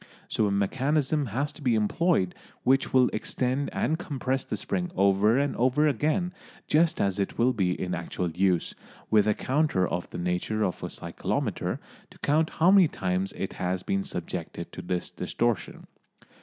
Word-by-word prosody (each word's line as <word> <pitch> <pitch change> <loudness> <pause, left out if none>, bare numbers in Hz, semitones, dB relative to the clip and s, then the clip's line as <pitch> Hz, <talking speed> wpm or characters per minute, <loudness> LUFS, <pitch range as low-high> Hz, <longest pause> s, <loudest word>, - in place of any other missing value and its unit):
So 110 - +1
a - - 0
mechanism 135 +8 +1
has 135 +7 -1
to - - -12
be 125 -4 +2
employed 110 - +1 0.3
which 135 +2 +3
will 130 -1 +5
extend 130 +5 -1
and 160 +2 0
compress 135 -4 -2
the - - -4
spring 180 -1 -2
over 100 +4 +4
and 140 0 +1
over 130 +5 +3
again, 155 - 0 0.3
just 160 +2 +3
as 100 0 +1
it 100 - -2
will 125 +2 +3
be 90 -5 0
in 90 -1 -2
actual 90 0 -3
use, 90 0 +1 0.4
with 105 -1 +5
a 105 - +3
counter 135 - +1
of 85 0 -3
the - - -7
nature 90 +5 -1
of 90 - -2
a - - -4
cyclometer - - -2 0.3
to - - -17
count 155 +2 +2
how 170 +4 +3
many 195 -4 +7
times 95 -4 -1
it 95 - -4
has 90 0 -2
been 95 - 0
subjected - - -5
to - - -7
this 90 -1 -3
distortion. 120 -5 -2
120 Hz, 170 wpm, -27 LUFS, 95-145 Hz, 0.4 s, many